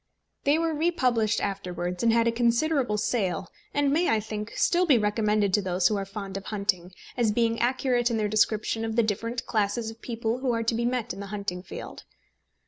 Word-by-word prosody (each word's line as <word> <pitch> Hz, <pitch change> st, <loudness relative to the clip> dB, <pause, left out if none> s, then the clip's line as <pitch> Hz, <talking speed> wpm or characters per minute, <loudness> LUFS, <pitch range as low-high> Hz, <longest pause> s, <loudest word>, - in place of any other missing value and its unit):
They 285 Hz, +2 st, +4 dB
were 330 Hz, -1 st, 0 dB
republished 255 Hz, -9 st, +1 dB
afterwards, 180 Hz, -2 st, -3 dB
and 230 Hz, -, +4 dB
had 230 Hz, 0 st, +3 dB
a -, -, +3 dB
considerable 240 Hz, +1 st, +1 dB
sale, 195 Hz, -6 st, -1 dB, 0.2 s
and 285 Hz, -1 st, +1 dB
may, 335 Hz, +4 st, +2 dB
I 220 Hz, -, +3 dB
think, 215 Hz, 0 st, -5 dB
still 360 Hz, +1 st, +2 dB
be 275 Hz, -6 st, +6 dB
recommended 210 Hz, -2 st, +1 dB
to 205 Hz, -, +4 dB
those 180 Hz, -1 st, +2 dB
who 215 Hz, -, 0 dB
are 195 Hz, -1 st, -2 dB
fond 195 Hz, -1 st, -6 dB
of 195 Hz, -, -8 dB
hunting, 200 Hz, -4 st, -1 dB, 0.2 s
as 235 Hz, -3 st, +2 dB
being 230 Hz, +1 st, +1 dB
accurate 245 Hz, 0 st, +1 dB
in 230 Hz, -, 0 dB
their 215 Hz, -1 st, +1 dB
description 215 Hz, +1 st, +1 dB
of 225 Hz, -1 st, -2 dB
the 235 Hz, -, +4 dB
different 225 Hz, +3 st, -2 dB
classes 220 Hz, +1 st, 0 dB
of 225 Hz, -, -16 dB
people 230 Hz, 0 st, -2 dB
who 260 Hz, -2 st, 0 dB
are 230 Hz, 0 st, 0 dB
to 230 Hz, -, +1 dB
be 235 Hz, +1 st, 0 dB
met 245 Hz, -2 st, -2 dB
in 195 Hz, -, -9 dB
the 200 Hz, -, -6 dB
hunting 200 Hz, -3 st, -4 dB
field. 180 Hz, -, -9 dB
225 Hz, 210 wpm, -27 LUFS, 205-240 Hz, 0.2 s, be